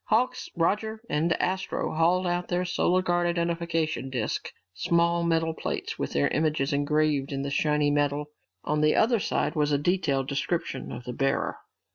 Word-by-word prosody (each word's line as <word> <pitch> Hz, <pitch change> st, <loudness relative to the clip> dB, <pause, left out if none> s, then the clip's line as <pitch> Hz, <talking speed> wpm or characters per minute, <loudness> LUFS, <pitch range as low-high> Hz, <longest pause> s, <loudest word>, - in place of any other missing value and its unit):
Hawks, 240 Hz, +4 st, +1 dB
Roger, 210 Hz, +6 st, 0 dB
and 155 Hz, +3 st, +1 dB
Astro 190 Hz, +1 st, -1 dB
hauled 175 Hz, +3 st, +2 dB
out 175 Hz, 0 st, -1 dB
their 180 Hz, 0 st, 0 dB
Solar 180 Hz, +1 st, +1 dB
Guard 175 Hz, -1 st, +1 dB
identification 170 Hz, -4 st, -1 dB
disks, 125 Hz, -4 st, -3 dB, 0.2 s
small 170 Hz, -, +2 dB
metal 165 Hz, -1 st, +1 dB
plates -, -, -4 dB
with -, -, -3 dB
their 70 Hz, 0 st, +3 dB
images 150 Hz, -2 st, 0 dB
engraved 145 Hz, -1 st, +1 dB
in 135 Hz, 0 st, -2 dB
the 140 Hz, -, -3 dB
shiny 150 Hz, 0 st, +2 dB
metal. 145 Hz, 0 st, 0 dB, 0.3 s
On 150 Hz, +1 st, 0 dB
the 155 Hz, 0 st, +4 dB
other 230 Hz, 0 st, +3 dB
side -, -, 0 dB
was 150 Hz, -2 st, +1 dB
a 145 Hz, -, +3 dB
detailed 145 Hz, -4 st, 0 dB
description 140 Hz, -1 st, -2 dB
of 120 Hz, -, -7 dB
the 125 Hz, -, -5 dB
bearer. 135 Hz, +2 st, 0 dB
160 Hz, 165 wpm, -27 LUFS, 145-175 Hz, 0.3 s, the